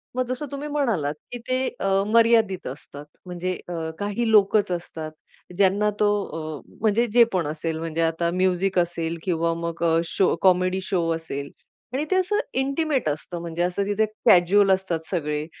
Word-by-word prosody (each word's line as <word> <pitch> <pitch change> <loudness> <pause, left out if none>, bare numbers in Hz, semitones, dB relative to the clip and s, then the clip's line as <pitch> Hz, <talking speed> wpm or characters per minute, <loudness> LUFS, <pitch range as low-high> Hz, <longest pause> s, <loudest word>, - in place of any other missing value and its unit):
मग 255 - 0
जसं 255 +4 -3
तुम्ही 285 +1 -5
म्हणालात 230 - 0 0.2
की 245 - -4
ते 255 0 0
अ, 195 - -1 0.2
मर्यादित 225 -3 +3
असतात, 145 +2 -9 0.2
म्हणजे 180 0 -3 0.2
आ, 165 -2 -3
काही 205 +3 -1
लोकच 205 -1 +4
असतात, 165 -3 -5 0.5
ज्यांना 200 +2 +3
तो 210 - +4 0.5
अ, - - -16 0.2
म्हणजे 225 +2 +3
जे 240 0 +8
पण 175 -5 0
असेल 160 +1 -3
म्हणजे 165 0 -3
आता 165 +1 +1
म्युझिक 185 +1 +1
असेल 170 -1 -1
किंवा 170 -2 0
मग 170 0 -4 0.2
शो 185 +3 +1
कॉमेडी 185 0 +3
शो 180 -4 -1
असेल 140 -3 -6 0.4
आणि 280 +4 -1
ते 375 - +4
असं 375 +3 +1 0.2
इंटिमेट 275 - 0
असतं, 155 +4 -5
म्हणजे 170 0 -4
असं 180 +3 0
तिथे 205 +2 +1 0.2
कॅज्युअल 195 +3 +5
असतात 190 -3 0
सगळे 150 -4 -2
185 Hz, 160 wpm, -24 LUFS, 165-220 Hz, 0.5 s, जे